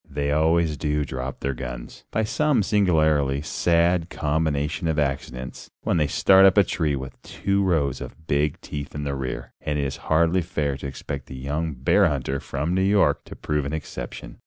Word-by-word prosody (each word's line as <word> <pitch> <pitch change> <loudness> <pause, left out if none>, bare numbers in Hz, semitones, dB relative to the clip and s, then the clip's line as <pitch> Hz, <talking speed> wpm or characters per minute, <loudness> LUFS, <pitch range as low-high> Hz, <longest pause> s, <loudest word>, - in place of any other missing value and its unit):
They 70 0 -1
always 80 0 +2
do 75 -1 0
drop 65 0 -5
their 70 - -1
guns, - - -8
by 110 - 0
some 145 +1 +2
singularly 80 -9 +2
sad 85 +2 +2
combination 75 +2 -1
of 80 -2 0
accidents, 65 -3 -3
when - - +1
they 75 -2 +2
start 95 +7 +5
up 95 +1 +6
a 100 - +8
tree 80 -5 0
with 65 -1 -8
two 100 +1 -1
rows 80 -8 +1
of 80 - -9
big 75 -1 0
teeth 70 -1 -6
in 75 - -3
the 70 -1 -2
rear, 65 -2 -5
and 75 -1 -2
it 70 - 0
is 70 - -3
hardly 85 +3 +3
fair 75 -5 -2
to 70 - -6
expect 70 0 -6
the 65 - -8
young 75 +4 -2
bear 90 +10 +4
hunter 70 -2 -1
from 75 +7 -3
New 95 - +2
York 100 +1 +3
to - - -10
prove 75 -1 -1
an 70 +2 -4
exception. 80 - -7
75 Hz, 190 wpm, -24 LUFS, 70-85 Hz, -, a